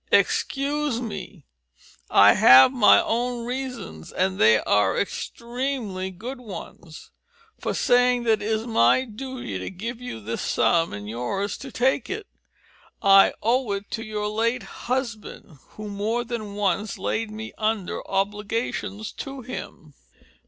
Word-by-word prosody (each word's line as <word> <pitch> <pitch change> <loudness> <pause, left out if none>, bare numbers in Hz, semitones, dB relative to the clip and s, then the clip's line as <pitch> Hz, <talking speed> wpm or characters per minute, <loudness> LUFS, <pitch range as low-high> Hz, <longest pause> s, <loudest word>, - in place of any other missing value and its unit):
Excuse 285 -2 +1
me, 200 - -7 0.6
I 100 +1 +7
have 130 - +8
my 240 -5 +6
own 240 +1 -1
reasons, 250 - -6
and 185 +1 -1
they 110 0 +6
are 105 -1 +2
extremely 235 -3 -3
good 235 +9 -7
ones, 175 -7 -10 0.5
for - - -2
saying 245 0 +3
that 220 -2 +2
it 205 - -3
is 220 0 -1
my 225 - +3
duty 245 - -6
to 95 - -5
give 230 +6 -6
you 250 - -6
this 110 +2 -4
sum 165 -1 +2
and 105 0 -7
yours 125 - -3
to 270 - -8
take 260 +2 +1
it. 415 +2 -4 0.8
I 195 -1 +7
owe 240 0 +1
it 200 0 -6
to 225 - -3
your 210 -2 -3
late 230 +4 0 0.3
husband, 230 - -4 0.2
who 215 0 -7
more 210 +4 -2
than 225 -4 -5
once 205 0 -1
laid 225 0 -2
me 220 +1 -7
under 215 -3 -1
obligations 210 +1 -2
to 270 -1 -7
him." 160 - -8
220 Hz, 140 wpm, -24 LUFS, 195-245 Hz, 0.8 s, have